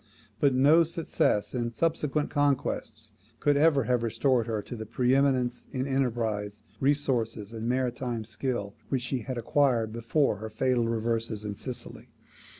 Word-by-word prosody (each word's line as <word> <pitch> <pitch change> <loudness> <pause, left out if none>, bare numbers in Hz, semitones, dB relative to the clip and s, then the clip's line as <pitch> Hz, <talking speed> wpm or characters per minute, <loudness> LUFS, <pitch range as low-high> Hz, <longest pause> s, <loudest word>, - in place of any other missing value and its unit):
But 140 -3 +3
no 150 +6 +6
success 165 - 0
in 120 -2 -2
subsequent 155 -2 0
conquests 135 -6 -1 0.3
could 145 -1 +3
ever 145 -2 +4
have 125 +1 +1
restored 115 +1 +1
her 110 -2 -2
to - - -7
the 110 -2 -7
pre 125 +3 +1
eminence 130 -3 +1
in 130 -1 -2
enterprise, 110 -6 -1 0.2
resources, 120 -7 0
and 115 +1 -3
maritime 125 -2 -1
skill 105 -1 -3 0.2
which 130 -3 0
she 130 +1 -1
had 125 +2 -5
acquired 120 -2 +1
before 115 +1 +1
her 110 +2 -6
fatal 120 +1 +1
reverses 115 -1 -1
in 105 -1 -3
Sicily. 125 +4 -7
120 Hz, 150 wpm, -28 LUFS, 110-135 Hz, 0.3 s, no